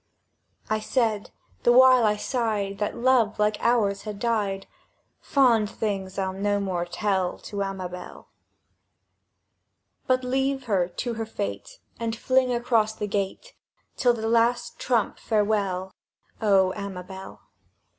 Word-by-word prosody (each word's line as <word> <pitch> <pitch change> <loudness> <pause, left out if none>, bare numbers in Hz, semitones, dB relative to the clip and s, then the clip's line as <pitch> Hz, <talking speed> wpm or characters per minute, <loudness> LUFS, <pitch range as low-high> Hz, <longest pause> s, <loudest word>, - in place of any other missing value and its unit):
I 215 - 0
said 220 -2 0 0.3
(the 240 - +4
while 255 -1 +7
I 210 - +2
sighed 210 -5 -2
That 210 - -2
love 235 -3 +3
like 210 0 +1
ours 210 -5 +2
had 210 -2 -6
died), 205 -4 -1 0.5
"Fond 235 -7 +3
things 195 -4 -3
I'll 190 -1 -1
no 205 +1 0
more 185 -3 -2
tell 190 0 -1
To 200 -1 -6
Amabel, 185 -2 -6 1.8
"But 255 0 +2
leave 265 +1 0
her 195 -7 +1
to 235 +7 -4
her 225 0 -3
fate, 100 - -5 0.2
And 230 -1 -2
fling 255 +2 +2
across 230 -3 +1
the 210 - -3
gate, 205 - -3 0.4
'Till 245 -2 +3
the 220 -1 -3
Last 235 +1 +1
Trump, 235 -5 0
farewell, 205 -4 0 0.5
O 195 -3 +4
Amabel! 190 -1 -8
215 Hz, 125 wpm, -25 LUFS, 195-240 Hz, 1.8 s, while